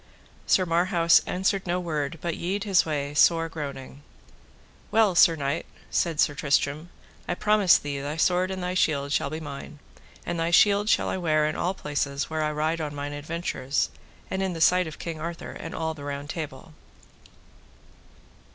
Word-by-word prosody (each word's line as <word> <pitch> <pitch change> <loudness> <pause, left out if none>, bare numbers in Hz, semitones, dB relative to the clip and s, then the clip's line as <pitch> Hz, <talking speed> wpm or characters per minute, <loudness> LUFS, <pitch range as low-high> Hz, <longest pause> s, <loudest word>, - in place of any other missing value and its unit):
Sir 185 - +4
Marhaus 170 0 +4
answered 190 +1 0
no 175 +1 0
word 155 -4 -3
but 170 -2 -2
yede 190 +3 -2
his 195 -5 +3
way 145 -2 -2
sore 165 +2 +4
groaning. 140 -4 -7 0.9
Well, 220 -4 +3
Sir 170 -1 +6
Knight, 140 +1 -2 0.2
said 165 -3 0
Sir 145 - +3
Tristram, 145 +2 0 0.4
I 175 - -1
promise 210 -2 +4
thee 140 -1 -4
thy 145 +3 -4
sword 180 +2 +2
and 190 -1 -4
thy 180 0 -2
shield 145 -6 +1
shall 140 - +1
be 155 +2 -5
mine; 145 0 -8 0.5
and 170 - -3
thy 165 0 0
shield 205 +4 +4
shall - - +3
I - - -2
wear 155 -4 +2
in 155 - -1
all 180 +3 -1
places 145 -2 -3
where 160 0 -1
I 150 0 0
ride 155 +2 -1
on 150 -1 -4
mine 145 0 -4
adventures, 145 -2 -2 0.4
and 190 - -1
in 190 -2 -1
the 165 - -6
sight 180 +2 +4
of 155 - -8
King 165 -2 -6
Arthur 170 +1 -5
and 165 - -7
all 160 0 -2
the 145 -2 -11
Round 140 0 -5
Table. 155 -2 -7
160 Hz, 180 wpm, -26 LUFS, 145-180 Hz, 0.9 s, Sir